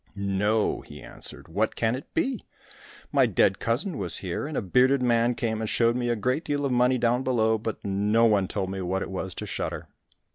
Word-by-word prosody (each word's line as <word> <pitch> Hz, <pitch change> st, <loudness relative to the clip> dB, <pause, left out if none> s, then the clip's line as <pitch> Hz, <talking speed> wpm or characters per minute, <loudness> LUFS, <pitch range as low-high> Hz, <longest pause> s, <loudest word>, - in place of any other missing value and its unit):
"No," 100 Hz, +2 st, 0 dB
he 75 Hz, -, -12 dB
answered; -, -, -7 dB
"what -, -, -1 dB
can 110 Hz, 0 st, +1 dB
it 130 Hz, +3 st, -7 dB
be? 270 Hz, -8 st, 0 dB, 0.7 s
My -, -, +4 dB
dead 95 Hz, +1 st, +2 dB
cousin 140 Hz, -, -1 dB
was 90 Hz, -4 st, +1 dB
here, 95 Hz, +9 st, -4 dB
and 155 Hz, -, -4 dB
a -, -, +1 dB
bearded 125 Hz, +7 st, +3 dB
man 120 Hz, 0 st, +2 dB
came 110 Hz, -3 st, -2 dB
and 110 Hz, -, -2 dB
showed 115 Hz, 0 st, +2 dB
me 120 Hz, -1 st, -1 dB
a 120 Hz, -, +2 dB
great 125 Hz, +8 st, -1 dB
deal 145 Hz, -2 st, -1 dB
of 135 Hz, -, 0 dB
money 125 Hz, +1 st, +3 dB
down 120 Hz, +1 st, +2 dB
below, 110 Hz, -4 st, +1 dB
but 110 Hz, 0 st, -5 dB
no 105 Hz, +4 st, +2 dB
one 100 Hz, -4 st, +3 dB
told 95 Hz, -1 st, -3 dB
me 95 Hz, 0 st, -4 dB
what 95 Hz, +1 st, -1 dB
it -, -, -7 dB
was 95 Hz, -2 st, -4 dB
to -, -, -5 dB
shudder." -, -, -4 dB
115 Hz, 215 wpm, -26 LUFS, 100-125 Hz, 0.7 s, My